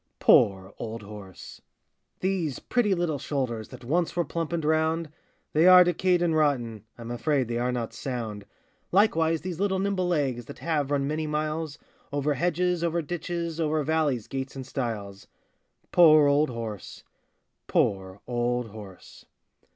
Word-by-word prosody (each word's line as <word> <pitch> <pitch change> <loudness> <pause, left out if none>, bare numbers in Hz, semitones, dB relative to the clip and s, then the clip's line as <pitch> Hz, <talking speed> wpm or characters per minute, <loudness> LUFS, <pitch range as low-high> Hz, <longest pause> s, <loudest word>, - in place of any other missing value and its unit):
poor 95 -1 +4
old 115 -1 -6
horse! 100 -3 -11 0.6
These 180 -8 -1
pretty 215 -6 +1
little 170 -5 -1
shoulders, 125 -7 -3
That - - -12
once 165 +7 0
were 175 -1 +1
plump 165 +3 -3
and 165 -3 -2
round, 160 0 +1 0.4
They 160 +4 +5
are 180 0 +10
decayed 175 0 +2
and 165 -2 +1
rotten,— 120 -8 0
I'm 115 0 -7
afraid 130 +2 0
they 120 0 -2
are 125 +1 0
not 115 -2 -3
sound. 115 -5 -5 0.4
Likewise 165 -5 +3
these 180 -2 -5
little 195 -1 +1
nimble 190 -1 0
legs, 135 -8 0
That - - -10
have 150 -4 -1
run 140 -1 +1
many 155 +1 -2
miles, 155 0 -2 0.3
Over 145 +1 0
hedges, 175 +2 0
over 170 0 0
ditches, 170 0 -4
Over 155 -1 +1
valleys, 150 -6 0
gates, 135 0 -5
and 135 -1 -6
stiles. 110 -7 -5 0.6
Poor 155 -4 +7
old 145 +1 +3
horse! 115 -5 -7 0.6
poor 95 0 0
old 120 -1 -1
horse! 100 -3 -12
150 Hz, 150 wpm, -27 LUFS, 120-170 Hz, 0.6 s, are